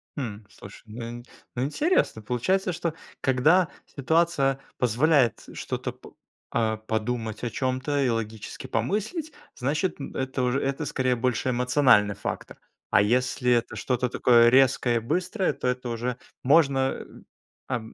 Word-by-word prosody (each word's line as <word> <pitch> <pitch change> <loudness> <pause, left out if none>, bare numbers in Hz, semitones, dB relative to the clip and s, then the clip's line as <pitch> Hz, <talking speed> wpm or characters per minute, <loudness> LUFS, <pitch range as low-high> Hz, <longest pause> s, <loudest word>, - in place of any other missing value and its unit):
Хм, 115 -7 -5
слушай, 100 +1 -13
ну 115 +3 -7
ин 120 0 -8 0.3
ну 125 - -1
интересно 220 - +1
получается, 180 - 0
что 170 -1 -2 0.3
когда 155 +8 +3 0.3
ситуация 140 -2 +2 0.2
позволяет 125 +1 +3
что-то - - -4
п - - -15 0.4
а, 110 -1 0
подумать 110 +1 -3
о 120 - -1
чём-то 130 +3 -1
и 130 - +2
логически 110 -2 -4
помыслить, 300 - -2 0.2
значит, 150 +7 -1
м, 135 - -7
это 130 0 -2
уже 125 +2 +1
это 140 +3 -2
скорее 130 -3 0
больше 125 +1 0
эмоциональный 125 -4 +3
фактор, - - -6 0.3
а - - +5
если 125 +3 +1
это 120 -1 +1
что-то 125 -1 -1
такое 120 -1 +5
резкое 125 -1 +4
и 115 - +2
быстрое, 180 - -1
то - - -4
это 125 0 -2
уже 120 +1 -3 0.2
можно, 135 -2 +3 0.6
ам, 115 -4 -4
125 Hz, 140 wpm, -26 LUFS, 120-145 Hz, 0.6 s, а